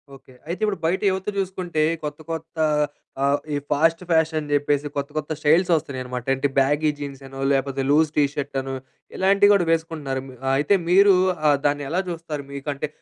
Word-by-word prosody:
Okay. 135 -1 -18
అయితే, 170 +2 -4
ఇప్పుడు 210 -2 0
బయట 175 +4 +1
యువత 190 +1 -4
చూసుకుంటే 185 -4 -1 0.2
కొత్త, 150 0 -5
కొత్త 165 0 -6 0.7
ఆహ్, 140 +1 +2
ఈ - - +1 0.2
ఫాస్ట్ 165 +3 +3
ఫ్యాషన్ 160 -1 +2
అని 150 -1 -7
చెప్పేసి 145 0 +1
కొత్త, 140 0 -2
కొత్త 155 0 -3
స్టైల్స్ 160 +4 +3
వస్తున్నాయన్నామట. 130 -5 -3
అంటే 135 +2 0
బ్యాగీ 145 +3 +2
జీన్స్ 140 -1 -7
అనో, 135 0 -10
లేకపోతే 135 0 0
లూజ్ 155 +2 +4
టీషర్ట్ 145 -1 0
అనో 135 0 -5 0.4
ఇలాంటివి 200 +2 +4
కూడా 195 -4 +3
వేసుకుంటున్నారు. 160 -5 -2
మి 130 - -11 0.2
అయితే 150 +9 +3
మీరు 195 +3 +6 0.4
ఆహ్, 145 - +4
దాన్ని 145 0 +1
ఎలా 175 +3 0
చూస్తారు? 165 -4 -5
మీకంటే 140 +1 -3
150 Hz, 170 wpm, -23 LUFS, 140-165 Hz, 0.7 s, మీరు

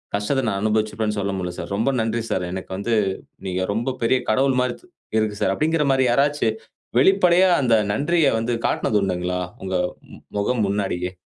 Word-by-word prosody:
கஷ்டத்த 105 +7 0
நான் 100 -2 -1
அனுபவிச்சிருப்பேன்னு 110 0 0
சொல்ல 100 0 -1
முடியல 90 -1 -3
சார் - - -5
ரொம்ப 110 +6 +1
நன்றி 115 +1 -1
சார். 90 - -1
எனக்கு 95 0 -6
வந்து 115 +4 0 0.5
நீங்க 95 0 -2
ரொம்ப 120 +4 -2
பெரிய 115 +3 +3
கடவுள் 130 +4 +2
மாரி 125 - -1
த் - - -21 0.3
இருக்கு 110 -1 0
சார்" - - +2
அப்டிங்கிற 160 0 +1
மாரி 130 -1 +3
யாராச்சு 140 0 +2 0.5
வெளிப்படையா 185 +4 +5
அந்த 120 -4 +3 0.2
நன்றிய 160 +9 +2
வந்து 115 +2 -1
காட்டினது 105 - +1
உண்டுங்களா? 90 -1 -1 0.2
உங்க 95 -1 -3 0.6
முகம் 115 +4 0
முன்னாடியே? 95 -3 -2
110 Hz, 165 wpm, -22 LUFS, 100-135 Hz, 0.6 s, வெளிப்படையா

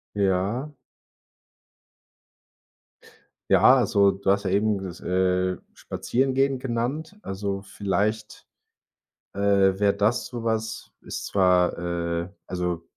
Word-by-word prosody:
Ja. 100 +8 0 2.8
Ja, 130 - +7
also, 100 -6 +3
du 95 0 0
hast 100 0 0
ja - - +1
eben 105 +2 +2
ges 90 -2 -8
äh, 90 0 +1 0.2
spazieren 130 +2 -1
gehen 135 0 +2
genannt. 135 - -3
Also, 100 0 -4
vielleicht 100 +2 -2 0.9
äh, - - -7 0.4
wäre 100 -1 +3
das 110 +5 +1
so 120 -2 -7
was. 110 -1 -3
Ist - - -6
zwar 90 -2 +3 0.5
äh, 85 - -10 0.2
also, 90 -2 -3
100 Hz, 105 wpm, -25 LUFS, 95-115 Hz, 2.8 s, Ja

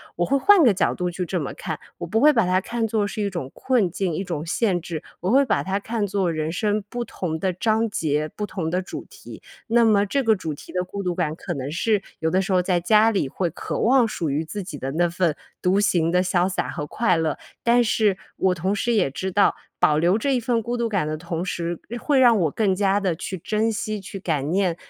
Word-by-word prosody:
我 175 - +1
会 275 - +2
换 400 +3 +6
个 235 -7 +6
角 190 - +1
度 180 -1 -2
去 180 +1 -3
这 180 +1 -1
么 140 - -4
看。 160 -4 -5 0.2
我 170 - -4
不 220 +6 +1
会 300 - +7
把 230 -6 +3
它 185 +1 +3
看 230 +2 -2
作 215 -1 0
是 210 +1 -4
一 200 - 0
种 170 -9 -5
困 235 -9 +1
境， 185 -1 -2
一 185 - -2
种 165 -5 -4
限 185 +1 +1
制、 160 -2 -6 0.2
我 180 - -2
会 270 +5 +5
把 - - +1
它 190 +1 -1
看 215 0 -2
作 195 -3 0
人 155 0 -2
生 210 +3 0
不 240 +1 -3
同 175 -7 -4
的 185 +3 0
章 220 +5 +1
节， 155 -6 -1
不 210 - -3
同 175 -5 -4
的 180 +2 0
主 185 - -7
题。 - - -12 0.3
那 235 +1 +4
么 210 -3 +4
这 270 +7 0
个 220 -3 +3
主 160 -4 -4
题 145 - -12
的 180 0 -1
孤 200 +2 -6
独 180 -1 -1
感， 160 -3 -1
可 175 +1 -5
能 135 -3 -4
是， 200 +6 +1 0.2
有 160 - 0
的 185 +2 +3
时 195 0 -2
候 180 - +4
在 180 -1 +1
家 215 +5 +4
里 195 -9 0
会 175 +6 -2
渴 165 - -5
望 250 0 +4
属 170 -7 -3
于 150 +3 -1
自 200 +5 -5
己 165 -5 -7
的 135 0 -4
那 175 +2 +2
份 170 -2 0 0.3
独 190 +2 +2
行 170 -5 +2
的 180 +1 +3
潇 180 -1 +2
洒 190 - -2
和 150 - -5
快 185 0 +1
乐。 160 -2 -1 0.2
但 240 +1 +4
是， 215 -3 +2 0.2
我 185 -1 +2
同 185 +3 -1
时 235 +4 0
也 190 -11 +2
知 190 +7 -4
道， 205 - +4 0.2
保 150 - +4
留 175 +5 +3
这 270 +4 +1
一 - - +1
份 235 0 0
孤 240 +3 -2
独 235 -1 0
感 195 -7 0
的 155 0 -3
同 170 +1 -4
时， 170 -1 -3 0.2
会 285 -3 +2
让 240 -3 +6
我 165 -4 +2
更 205 +1 +1
加 200 +1 +2
地 190 -4 0
去 190 +3 -5
珍 215 +6 0
惜 215 -1 -3
去 195 +1 -8
感 150 -6 -1
念 185 -2 +1
190 Hz, 270 characters per minute, -23 LUFS, 170-215 Hz, 0.3 s, 会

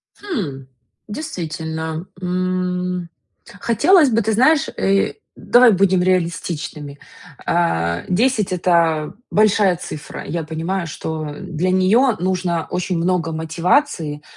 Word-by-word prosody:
Хм, 175 - -5 0.4
действительно, 160 - -5 0.2
м, 180 -1 -2 0.5
хотелось 300 - +4
бы, 230 0 +2
ты 220 +1 0
знаешь, 275 +6 +4
э, 195 0 +2 0.2
давай 245 -1 +5
будем 190 -1 +3
реалистичными. 165 -5 -2 0.5
А, 85 - 0
10- 215 +1 +1
это 170 -4 +1 0.2
большая 205 -3 +3
цифра. 150 -3 -8
Я 165 +1 -3
понимаю, 165 +3 -3
что 155 -1 -5
для 170 +3 -2
неё 215 +7 +3
нужно 180 -2 -1
очень 180 0 -1
много 165 -1 0
мотивации, 160 - 0
180 Hz, 105 wpm, -20 LUFS, 160-200 Hz, 0.5 s, давай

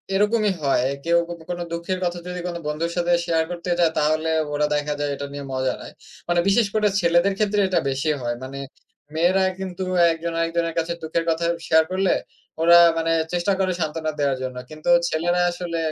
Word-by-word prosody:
এরকমই 210 +1 +2
হয়। 135 -2 +2 0.2
কেউ 170 0 +3
যদি 170 -1 -8
কোনো 175 0 -3
দুঃখের 170 +2 -3
কথা 175 0 -2
যদি 180 0 -5
কোনো 175 -1 -4
বন্ধুর 165 +3 -2
সাথে 175 0 +1
শেয়ার 165 -1 +1
করতে 175 0 -5
যায় 165 -2 +4
তাহলে 155 +2 +1 0.2
ওরা 150 +1 +1
দেখা 150 0 -1
যায় 145 0 -1
এটা 140 - -5
নিয়ে 140 -1 -6
মজা 130 0 0
নেয়। - - -10 0.4
মানে 175 0 +3
বিশেষ 205 +2 +4
করে 210 -1 +3
ছেলেদের 175 +3 +3
ক্ষেত্রে 210 -1 +1
এটা 185 - +2
বেশি 135 +3 -1
হয়। 120 -1 -2
মানে 135 +1 -7 0.6
মেয়েরা 180 +4 +3 0.2
কিন্তু 190 -1 -4 0.3
একজন 165 +1 -4
আরেকজনের 165 0 0
কাছে 165 +1 -2
দুঃখের 160 +1 -1
কথা 165 +1 0 0.2
শেয়ার 160 0 +5
করলে, 190 0 +1 0.5
ওরা 170 +1 +7 0.2
মানে 165 0 0 0.2
চেষ্টা 175 +3 +1
করে 190 -1 +1
সান্ত্বনা 155 -1 -2
দেওয়ার 140 -2 +1
জন্য। 130 -1 -5
কিন্তু 155 +2 -5 0.2
ছেলেরা 175 +3 +1
আসলে 175 -1 -4
170 Hz, 190 wpm, -23 LUFS, 155-180 Hz, 0.6 s, ওরা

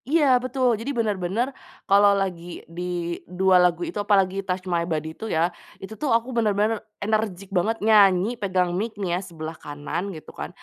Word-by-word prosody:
Iya 310 0 +4 0.2
betul. 255 0 0
Jadi 265 +5 -3
benar-benar 210 +1 0 0.4
kalau 200 +1 +6
lagi 175 -2 -5
di 165 +2 -8 0.5
dua 185 +1 +3
lagu 175 -1 +2
itu 335 - -6
apalagi 195 -2 +2
Touch 185 -1 -3
My 175 -2 0
Body 160 -1 -2
itu 220 +6 -7
ya. 170 +1 +1 0.2
Itu 195 +3 -9
tuh 300 - 0
aku 230 +1 -8
bener-bener 215 -1 +1 0.2
energik 205 -3 -1
banget 220 +6 +1
nyanyi 205 -1 +5
pegang 185 -3 +1
mic 225 +3 -2
nih 195 -3 -3
ya 175 - +1
sebelah 160 -1 -6
kanan 145 +4 -4
gitu 155 - -11
kan, - - -4
195 Hz, 175 wpm, -24 LUFS, 175-220 Hz, 0.5 s, kalau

